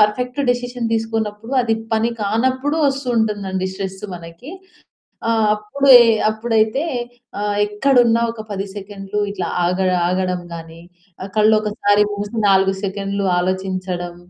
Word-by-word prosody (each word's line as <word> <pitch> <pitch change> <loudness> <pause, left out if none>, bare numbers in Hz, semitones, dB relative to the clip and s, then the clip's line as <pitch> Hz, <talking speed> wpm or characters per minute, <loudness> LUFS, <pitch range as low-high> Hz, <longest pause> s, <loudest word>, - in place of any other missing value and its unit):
Perfect 250 +6 +1
decision 245 -1 -2
తీసుకోనప్పుడు 225 +1 -2
అది 225 -2 +1 0.2
పని 225 +1 +2
కానప్పుడు 260 +8 0
వస్తుంటుందండి 220 -8 -1
స్ట్రెస్ 190 0 -6
మనకి. 170 - -10 0.8
ఆహ్, 225 -1 +2
అప్పుడు, 215 +7 -2 0.4
అప్పుడైతే 220 +3 +1 0.6
ఆహ్, 205 0 -1
ఎక్కడున్నా 235 +1 +3
ఒక 230 - -10
10 195 -1 -3
సెకండ్‌లు 200 0 -6
ఇట్లా 185 -4 -3 0.2
ఆగ 180 +2 0 0.3
ఆగడం 185 0 -1
గాని 165 0 -10 0.6
కళ్ళొకసారి 210 -1 +3
మూసి 205 +2 -5
4 195 0 +4
సెకన్లు 200 0 -2
ఆలోచించడం, 185 -1 -3
210 Hz, 110 wpm, -19 LUFS, 190-230 Hz, 0.8 s, 4